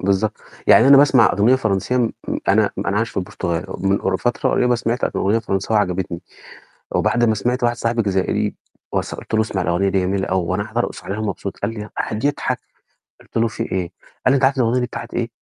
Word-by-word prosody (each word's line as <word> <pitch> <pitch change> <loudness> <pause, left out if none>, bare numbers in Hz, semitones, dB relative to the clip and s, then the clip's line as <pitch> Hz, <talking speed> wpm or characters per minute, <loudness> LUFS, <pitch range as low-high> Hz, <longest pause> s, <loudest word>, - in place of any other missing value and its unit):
بالضبط، 100 +2 0 0.3
يعني 135 - +7
أنا 140 - +9
باسمع 135 -4 +5
أُغنيّة 110 +5 +4
فرنسية 110 +1 0
امم 120 -3 +1 0.4
أنا - - +4
أنا - - -1
عايش - - 0
في - - -19
البرتغال 85 -1 -3
من 95 +1 +1
قر - - 0
فترة - - 0
قريّبة 125 0 +2
سمعت 120 +2 -1
أُغنيّة 105 +4 +2
فرنساوي 105 0 0
عجبتني، 90 -3 -2 0.7
وبعد 120 0 +2
ما 110 -1 +3
سمعت 120 +5 -1
واحد 120 0 +2
صاحب 115 0 0
جزائري 95 -2 0 0.4
وس - - -2
قُلت - - -7
له 110 - +4
اسمع 100 -4 -1
الأغنية 90 +3 +1
دي 95 0 +1
جميلة 95 +1 -1
أوي، 95 -2 0
وأنا 95 +4 -1
قاعد 110 +2 -11
أرقص - - -2
عليها 100 +2 -4
ومبسوط 100 -2 -4
قال 100 - -2
لي 105 -1 -6
قعد 110 +4 -3
يضحك، 145 - 0 0.6
قُلت - - -16
له: 115 - +3
"في 110 - -5
إيه؟" 90 -2 -1 0.4
قال 130 - +6
لي: - - +4
"أنت 135 -1 +2
عارف 135 +1 +3
الأُغنيّة 125 0 +2
دي 125 - 0
بتاعة - - -7
إيه؟" 120 -1 -1
110 Hz, 215 wpm, -20 LUFS, 95-120 Hz, 0.7 s, أنا